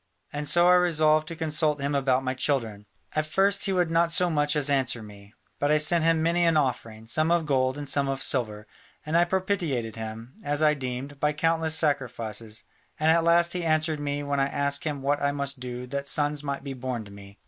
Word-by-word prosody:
And 145 0 -4
so 175 +3 +5
I 180 - +6
resolved 155 -3 +3
to 165 - -6
consult 155 -2 0
him 140 +1 -2
about 135 -2 +1
my 130 0 -1
children. 115 -6 -2 0.3
At 155 0 0
first 195 +5 +2
he 195 - 0
would 175 -3 +1
not 165 0 +2
so 180 0 +1
much 150 0 +1
as 150 -2 +1
answer 130 -5 0
me, 100 0 -14 0.2
but 145 +1 +1
I 155 - +4
sent 160 +2 +3
him 165 -1 +2
many 170 +1 +1
an 165 -2 +3
offering, 115 -6 -2
some 155 +7 0
of 170 -1 +2
gold 130 -2 0
and 145 -1 -6
some 140 0 0
of 135 0 -1
silver, 105 -5 0 0.4
and 155 +2 -2
I 170 +1 +5
propitiated 175 - -2
him, 110 +2 -7
as 145 +1 0
I 150 -1 +5
deemed, 135 +1 -6
by 150 +1 +1
countless 160 +1 +1
sacrifices, 115 -8 -2 0.4
and 155 +1 +3
at 165 0 +3
last 170 +1 +3
he 180 -1 -3
answered 155 -1 0
me 145 0 -3
when 140 -1 -1
I 135 - +2
asked 140 0 -1
him 145 -3 -3
what 145 +1 0
I 140 0 +1
must 140 -1 -2
do 125 0 -6
that 140 +1 -4
sons 145 0 +1
might 140 -1 -4
be 140 -1 -5
born 125 -3 -5
to 100 - -13
me. 100 0 -13
145 Hz, 225 wpm, -26 LUFS, 130-160 Hz, 0.4 s, I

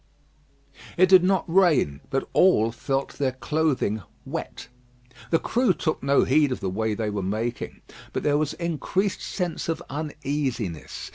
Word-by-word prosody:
It 185 +1 +5
did 185 -2 +8
not 190 -1 +2
rain, 165 - +3
but 135 - -1
all 115 - +4
felt 135 +4 -3
their 135 -3 +1
clothing 135 -6 0 0.2
wet. - - -6 0.6
The 165 - +4
crew 240 +3 +1
took 155 - -2
no 140 +1 +3
heed 145 +1 +3
of 125 - -2
the 95 -3 -2
way 110 +2 -1
they 110 -1 -2
were 105 -1 -2
making; 110 +5 -3 0.3
but - - -3
there 145 0 +2
was 150 -2 -1
increased 175 +4 -1
sense 180 -3 -3
of 165 0 -1
uneasiness. 140 - -3
145 Hz, 150 wpm, -25 LUFS, 115-170 Hz, 0.6 s, did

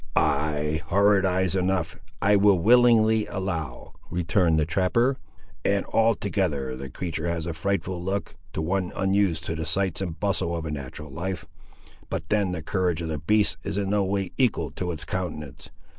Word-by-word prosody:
"Ay, 75 +1 +1
horrid 100 0 +4
eyes 95 0 +1
enough, 90 -4 0 0.2
I 105 +2 +5
will 100 -1 +5
willingly 110 +1 +5
allow," 85 -9 -4 0.2
returned 85 -1 +2
the 75 - +2
trapper; 100 - +1 0.4
"and 100 0 +1
altogether 95 - +1
the 65 +1 -7
creatur' 85 +3 -4
has 85 -1 -2
a 85 - -3
frightful 95 +1 -2
look, 100 +2 -2 0.2
to 80 - -2
one 90 +2 -1
unused 95 -4 +1
to 80 - -2
the 80 - -3
sights 90 +2 +1
and 85 -4 -4
bustle 85 -4 0
of 80 - -5
a 80 - -3
natural 70 +1 -7
life; 85 +1 -4 0.6
but 80 - -4
then 100 -3 +2
the 85 -4 -4
courage 85 0 0
of 80 - -4
the 75 -2 -2
beast 90 -1 +2
is 100 0 -3
in 100 -1 -1
no 105 -1 +2
way 95 0 -1
equal 105 - +1
to 90 +5 -3
its 80 -1 -5
countenance. 75 -6 -5
90 Hz, 175 wpm, -25 LUFS, 80-100 Hz, 0.6 s, I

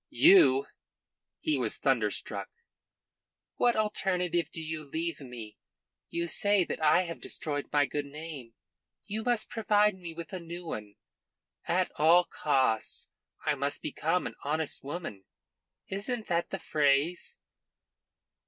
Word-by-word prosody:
"You?" 390 +3 +6 0.8
He 310 - +1
was - - -1
thunderstruck. - - 0 1.1
"What 240 -1 +4
alternative 180 -6 0
do - - -7
you 160 -1 -4
leave 165 +4 -3
me? 120 -6 -9 0.5
You 170 0 -1
say 205 +2 +3
that 165 - -5
I 155 +4 +5
have 170 -2 -6
destroyed 145 -2 -3
my 145 -1 +4
good 145 +1 -3
name. 145 -5 -8 0.5
You 215 +2 -3
must 240 -2 0
provide 210 -2 +3
me 175 -3 -8
with 170 0 -7
a 185 - -3
new 170 +1 -7
one. 105 -9 -6 0.7
At 180 +2 +1
all 165 +4 +7
costs 130 -9 0 0.4
I - - +3
must 145 0 -2
become 165 +4 0
an - - -4
honest 155 +1 -1
woman. 140 - -6 0.6
Isn't 215 +4 -2
that 170 -1 0
the 195 - -3
phrase?" 155 - +1
165 Hz, 130 wpm, -30 LUFS, 145-190 Hz, 1.1 s, all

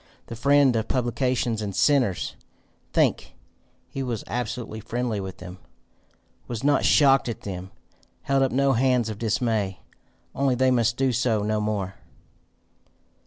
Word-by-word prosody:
The 115 - -8
friend 140 +1 +4
of 110 0 -1
publicans 120 -2 0
and 100 -3 -4
sinners! 130 -10 +2 0.6
Think: - - +1 0.5
he 135 - -6
was 120 -5 -3
absolutely 120 -1 -4
friendly 115 0 -3
with 95 -1 -6
them! 90 +1 -10 0.9
was 120 -1 -5
not 145 0 +3
shocked 135 -3 +4
at 115 - -5
them! 95 -1 -6 0.5
held 135 0 +1
up 135 - +2
no 135 +1 +2
hands 125 -2 +2
of 105 -1 -6
dismay! 110 -4 -1 0.5
Only 135 -1 +1
they 130 +1 +3
must 120 -1 +2
do 135 -1 +2
so 115 -3 +1
no 105 0 0
more. 100 -3 -3
120 Hz, 140 wpm, -25 LUFS, 105-130 Hz, 0.9 s, friend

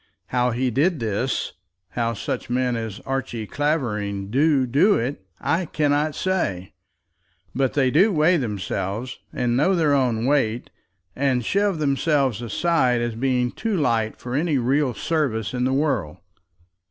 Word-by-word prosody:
How 125 0 +1
he 125 +2 0
did 150 +7 +1
this, 115 +3 -2 0.4
how 115 +1 -1
such - - -4
men 125 0 0
as 110 -3 -5
Archie 130 -4 -3
Clavering 105 -9 -2
do 140 +1 +3
do 145 - +4
it, 120 -3 -3 0.2
I 175 +2 0
cannot 150 0 0
say; 100 - -2 0.8
but 135 0 0
they 130 -3 +3
do 190 - +4
weigh 170 +1 +3
themselves, 105 - -3
and 120 -1 0
know 155 +9 +3
their 155 -4 +2
own 120 -4 +1
weight, 125 -5 0 0.4
and 130 -3 0
shove 200 - +1
themselves 140 -5 +1
aside 125 - +1
as 120 -1 -2
being 125 +1 0
too 220 - -2
light 115 -7 0
for 125 - -7
any 150 +1 +1
real 130 +1 +1
service 135 -10 -1
in 125 0 0
the 130 - +1
world. 135 - 0
130 Hz, 145 wpm, -23 LUFS, 115-150 Hz, 0.8 s, do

